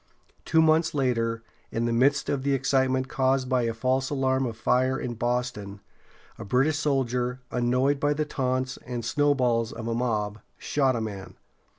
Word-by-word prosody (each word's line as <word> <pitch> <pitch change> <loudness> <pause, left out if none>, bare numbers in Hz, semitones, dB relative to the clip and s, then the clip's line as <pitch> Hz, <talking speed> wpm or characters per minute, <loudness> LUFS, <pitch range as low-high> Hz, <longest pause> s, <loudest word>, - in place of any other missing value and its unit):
Two 160 0 +4
months 160 0 +3
later, 115 -4 0 0.3
in 115 +1 -2
the 120 - 0
midst 135 +4 +2
of 140 - -1
the 140 0 +1
excitement 130 -1 +1
caused 130 0 +1
by 130 -1 +2
a - - 0
false 130 +3 0
alarm 135 -2 +1
of 115 -2 -6
fire 130 +3 +1
in 120 - -4
Boston, 115 -4 -3 0.6
a - - -5
British 135 +8 +1
soldier, 125 -4 0
annoyed 125 +3 +1
by 145 +1 +1
the 155 +1 -1
taunts 130 -2 -2
and 120 -2 -6
snowballs 125 -5 +1
of 115 0 -6
a 115 - -1
mob, 110 -3 -1 0.2
shot 135 -3 +1
a 115 - -2
man. 100 -3 -6
130 Hz, 170 wpm, -26 LUFS, 115-135 Hz, 0.6 s, Two